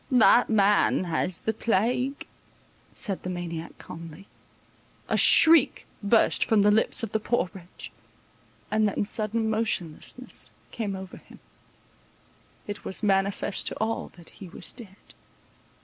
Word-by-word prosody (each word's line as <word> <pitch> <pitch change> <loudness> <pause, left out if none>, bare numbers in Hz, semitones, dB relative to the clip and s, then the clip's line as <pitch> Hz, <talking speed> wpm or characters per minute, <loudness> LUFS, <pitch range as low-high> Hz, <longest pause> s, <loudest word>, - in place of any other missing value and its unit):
"That 245 -1 +5
man 205 -3 +3
has 175 +1 -2
the 220 - -1
plague," 240 +6 -1 0.7
said 195 -6 -3
the 185 - -6
maniac 170 -2 -6
calmly. 165 +2 -11 0.8
A - - 0
shriek 325 -4 +6 0.2
burst 220 +2 +3
from 215 -3 +2
the 205 - +4
lips 220 +2 +2
of 225 - -4
the 220 - 0
poor 215 -4 -1
wretch; 180 -3 -11 0.8
and 215 0 +2
then 205 0 -2
sudden 220 +1 -2
motionlessness 220 +1 -4 0.2
came 205 -4 -4
over 190 -1 -9
him; - - -17 1.3
it 205 0 -7
was 190 - -3
manifest 195 0 0
to - - -3
all 225 +1 -3
that 170 -2 -10
he 190 - -12
was - - -7
dead. 210 -6 -12
205 Hz, 135 wpm, -26 LUFS, 185-225 Hz, 1.3 s, shriek